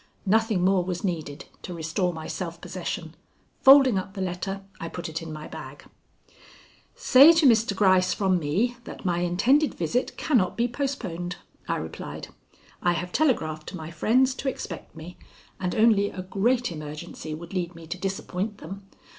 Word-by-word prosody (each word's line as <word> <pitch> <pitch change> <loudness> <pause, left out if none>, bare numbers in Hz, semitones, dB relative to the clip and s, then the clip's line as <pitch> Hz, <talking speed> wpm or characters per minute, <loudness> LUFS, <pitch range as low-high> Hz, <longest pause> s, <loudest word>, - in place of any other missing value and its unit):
Nothing 215 -2 +2
more 190 -1 +3
was 180 -1 -4
needed 160 -5 -3 0.2
to 180 - -7
restore 170 +3 -1
my 160 -2 -7
self 170 -2 -5
possession. 175 -2 -5 0.5
Folding 265 -6 +7
up 195 +1 -8
the - - -6
letter, 190 +2 -3 0.2
I 165 - -5
put 175 0 -6
it 160 +1 -4
in 165 -1 -7
my 155 0 -7
bag. - - -10 1.1
"Say 320 - +7
to 325 -2 +3
Mr. 225 -5 +4
Gryce 185 -2 +4
from 190 -3 +1
me 200 +12 0
that - - -9
my 175 -2 +1
intended 235 - +2
visit 250 +1 -1
cannot 225 - +1
be 235 +1 +2
postponed," 210 - -3 0.3
I - - 0
replied. 80 +1 -6 0.5
"I 175 - +3
have 175 +2 -4
telegraphed 160 - 0
to - - -6
my 160 0 -7
friends 255 +11 +3
to 270 - 0
expect 175 -11 -7
me, 165 +3 -10 0.4
and 180 -2 -2
only 215 -2 +4
a 185 - -7
great 235 +5 +1
emergency 155 0 -7
would 170 +4 -10
lead 175 -2 -2
me 165 -1 -11
to 165 +3 -5
disappoint 195 +2 -3
them. 195 +4 -9
185 Hz, 170 wpm, -26 LUFS, 170-225 Hz, 1.1 s, Folding